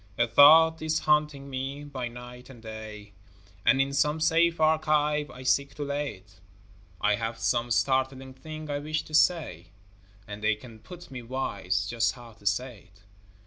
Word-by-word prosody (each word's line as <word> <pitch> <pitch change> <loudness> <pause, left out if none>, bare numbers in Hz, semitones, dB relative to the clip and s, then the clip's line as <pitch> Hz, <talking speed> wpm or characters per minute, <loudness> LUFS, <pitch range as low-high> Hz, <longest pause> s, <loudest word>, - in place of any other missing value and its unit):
A 120 - +3
thought 160 +5 +7
is 155 0 0
haunting 150 -2 +1
me 135 +2 -5
by 135 -4 -5
night 125 +1 -11
and 130 -3 -13
day, 110 -2 -9 0.5
And 135 - +4
in 135 +1 +1
some 150 +3 +1
safe 165 +1 +2
archive 150 -2 +2
I 125 +1 -11
seek 140 +2 +1
to 145 - -4
lay 145 0 -3
it; 95 0 -22 0.6
I 105 - +2
have 115 +1 -4
some 120 +1 0
startling 130 +2 0
thing 155 +3 -9
I 145 - -2
wish 155 +1 -3
to 155 - -15
say, 155 - +2 0.6
And 105 0 -8
they 110 0 +2
can 110 +1 -14
put 175 +8 -12
me 130 -2 -7
wise 100 -7 -2
just 115 +2 0
how 120 -2 -13
to 105 -2 -9
say 115 0 -2
it. 105 +2 -25
130 Hz, 175 wpm, -27 LUFS, 115-150 Hz, 0.6 s, thought